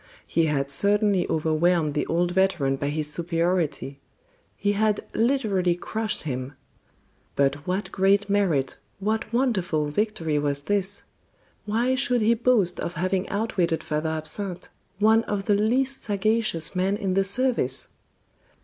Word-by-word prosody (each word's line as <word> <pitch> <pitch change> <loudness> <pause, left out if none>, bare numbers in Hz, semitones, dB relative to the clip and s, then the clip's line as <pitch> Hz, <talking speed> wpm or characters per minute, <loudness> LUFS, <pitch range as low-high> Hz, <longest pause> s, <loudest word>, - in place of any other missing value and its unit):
He 165 -1 +1
had 140 -2 -1
certainly 200 +2 +2
overwhelmed 160 0 +1
the 150 - -1
old 175 +1 +1
veteran 175 -8 +1
by 140 +1 -3
his 150 0 -2
superiority; 165 -4 -1 0.6
he 205 - +1
had 210 0 +1
literally 215 -8 +1
crushed 215 +4 -3
him. 130 -2 -4 0.8
But 140 +2 0
what 185 0 -2
great 195 +2 +2
merit, 185 -10 +1 0.2
what 215 +3 -2
wonderful 190 - 0
victory 165 -4 -1
was 140 -1 -1
this? 200 +1 -1 0.6
Why 230 +5 +1
should 250 -2 +1
he 220 +2 +4
boast 225 -6 +2
of 170 - -3
having 185 +3 -1
outwitted 195 -6 -1
Father 155 +1 -2
Absinthe, 165 +4 -5 0.3
one 220 +2 +4
of 200 -1 -3
the 210 - +3
least 255 +6 +1
sagacious 205 -5 0
men 190 +2 +1
in 195 -3 -2
the 195 +1 +3
service? 200 - +2
190 Hz, 135 wpm, -25 LUFS, 160-210 Hz, 0.8 s, he